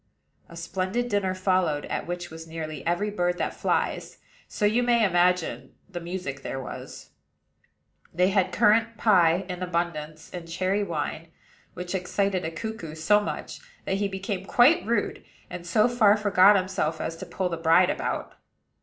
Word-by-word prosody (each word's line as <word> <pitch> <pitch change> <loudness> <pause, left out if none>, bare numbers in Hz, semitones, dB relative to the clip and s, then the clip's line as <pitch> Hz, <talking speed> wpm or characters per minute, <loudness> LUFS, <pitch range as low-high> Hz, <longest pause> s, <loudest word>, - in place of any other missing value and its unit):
A 170 - -11
splendid 190 +8 -2
dinner 195 -3 0
followed, 185 -6 +1
at - - -4
which 175 -1 -5
was 160 0 -9
nearly 160 -1 -6
every 200 +5 0
bird 180 -3 0
that - - -2
flies; - - -1 0.3
so 210 - -2
you 220 +4 +3
may 240 -2 +3
imagine 180 -2 +1
the 185 -3 -6
music 170 -6 -5
there 135 - -4
was. 130 - -9 1.0
They 180 +2 +2
had 190 -2 +1
currant 225 +3 +3
pie 180 -4 +4
in 180 -1 -6
abundance; 165 -3 -3
and 175 -2 -7
cherry 190 +4 0
wine, 165 -2 -4 0.5
which 180 0 -5
excited 190 0 -1
a 160 - -2
cuckoo 165 -2 -6
so 205 +6 +3
much, 210 - -5 0.3
that 190 - 0
he 200 0 0
became 195 0 -4
quite 290 +9 +5
rude, 230 -3 -1 0.3
and 175 -1 -7
so 215 +6 +4
far 220 -4 +4
forgot 205 -1 +5
himself 185 -5 -1
as 165 - -3
to - - -8
pull 185 -1 -2
the 170 - -3
bride 165 +3 +4
about. - - -3
185 Hz, 165 wpm, -26 LUFS, 170-205 Hz, 1.0 s, quite